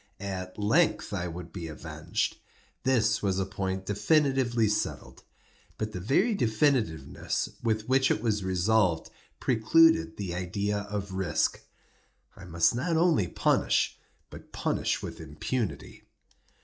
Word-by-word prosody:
At 95 Hz, -2 st, -5 dB
length 110 Hz, +3 st, +2 dB
I 90 Hz, -3 st, -2 dB
would 85 Hz, -1 st, -8 dB
be 85 Hz, -4 st, -5 dB
avenged; 75 Hz, -, -3 dB, 0.4 s
this 115 Hz, -4 st, +2 dB
was 95 Hz, -2 st, 0 dB
a 95 Hz, -, 0 dB
point 95 Hz, -1 st, -3 dB
definitively 130 Hz, 0 st, +2 dB
settled—but 105 Hz, +1 st, -5 dB
the 90 Hz, -, -5 dB
very 180 Hz, -, +2 dB
definitiveness 110 Hz, -, 0 dB
with 110 Hz, -2 st, -1 dB
which 130 Hz, +1 st, +3 dB
it -, -, +1 dB
was 105 Hz, -3 st, 0 dB
resolved, 95 Hz, -1 st, +1 dB, 0.3 s
precluded 115 Hz, -, +4 dB
the 95 Hz, -4 st, -4 dB
idea 100 Hz, +3 st, -2 dB
of 100 Hz, -2 st, -4 dB
risk. 95 Hz, -1 st, 0 dB, 0.7 s
I 95 Hz, -, -11 dB
must 85 Hz, -1 st, +2 dB
not 160 Hz, +7 st, 0 dB
only 160 Hz, -, +3 dB
punish, -, -, +1 dB, 0.3 s
but -, -, -12 dB
punish -, -, -1 dB
with -, -, -6 dB
impunity. 105 Hz, -, -4 dB
105 Hz, 125 wpm, -28 LUFS, 95-120 Hz, 0.7 s, precluded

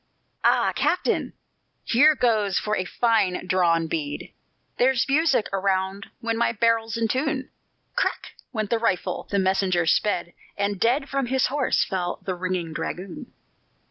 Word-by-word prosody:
"Ah, -, -, +3 dB
captain! 360 Hz, -, 0 dB, 0.5 s
here 295 Hz, +6 st, +5 dB
goes 215 Hz, -7 st, +1 dB
for 215 Hz, 0 st, 0 dB
a 185 Hz, -, -2 dB
fine 215 Hz, -4 st, +1 dB
drawn 175 Hz, -3 st, +2 dB
bead, 150 Hz, -3 st, -4 dB, 0.5 s
There's 255 Hz, -1 st, +3 dB
music 280 Hz, -4 st, +2 dB
around 195 Hz, 0 st, -1 dB
when 230 Hz, -1 st, -1 dB
my 235 Hz, -, +2 dB
barrel's 230 Hz, 0 st, +1 dB
in 230 Hz, -1 st, +1 dB
tune!" 265 Hz, +3 st, -1 dB, 0.4 s
Crack! -, -, -1 dB, 0.2 s
went 215 Hz, -4 st, -3 dB
the 230 Hz, -, +2 dB
rifle, 225 Hz, -5 st, -1 dB
the 200 Hz, -, 0 dB
messenger 190 Hz, -2 st, +2 dB
sped, 175 Hz, 0 st, +1 dB, 0.2 s
And 200 Hz, -1 st, -1 dB
dead 260 Hz, +6 st, +2 dB
from 275 Hz, -2 st, -1 dB
his 265 Hz, +1 st, +2 dB
horse 285 Hz, -3 st, +2 dB
fell 180 Hz, -2 st, -2 dB
the 190 Hz, -, -2 dB
ringing 180 Hz, -2 st, -3 dB
dragoon. 185 Hz, -, -6 dB
210 Hz, 140 wpm, -24 LUFS, 185-245 Hz, 0.5 s, here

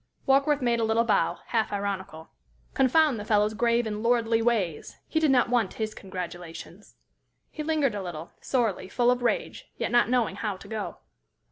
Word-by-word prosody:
Warkworth 275 Hz, +1 st, +3 dB
made 235 Hz, -1 st, +2 dB
a -, -, +1 dB
little 225 Hz, +1 st, +2 dB
bow, 230 Hz, -, +1 dB
half 225 Hz, -2 st, 0 dB
ironical. 195 Hz, -5 st, -4 dB, 0.4 s
Confound 270 Hz, -1 st, +3 dB
the -, -, -5 dB
fellow's 210 Hz, 0 st, +2 dB
grave 235 Hz, +1 st, +2 dB
and 210 Hz, -1 st, -3 dB
lordly 230 Hz, -1 st, +2 dB
ways! 210 Hz, -9 st, -1 dB
He 315 Hz, -, 0 dB
did 315 Hz, -2 st, +3 dB
not 255 Hz, -2 st, +4 dB
want 235 Hz, -6 st, +1 dB
his 215 Hz, -1 st, -3 dB
congratulations. 180 Hz, 0 st, -8 dB, 0.6 s
He 310 Hz, -, -6 dB
lingered 300 Hz, -5 st, +1 dB
a 205 Hz, -, -3 dB
little, 170 Hz, -3 st, -7 dB
sorely, 225 Hz, -7 st, -1 dB
full 245 Hz, +3 st, +3 dB
of 250 Hz, 0 st, 0 dB
rage, 240 Hz, -, -2 dB
yet -, -, -2 dB
not 240 Hz, -1 st, +4 dB
knowing 240 Hz, -6 st, +1 dB
how 205 Hz, -3 st, -3 dB
to -, -, -13 dB
go. 220 Hz, -2 st, -5 dB
225 Hz, 175 wpm, -27 LUFS, 200-245 Hz, 0.6 s, not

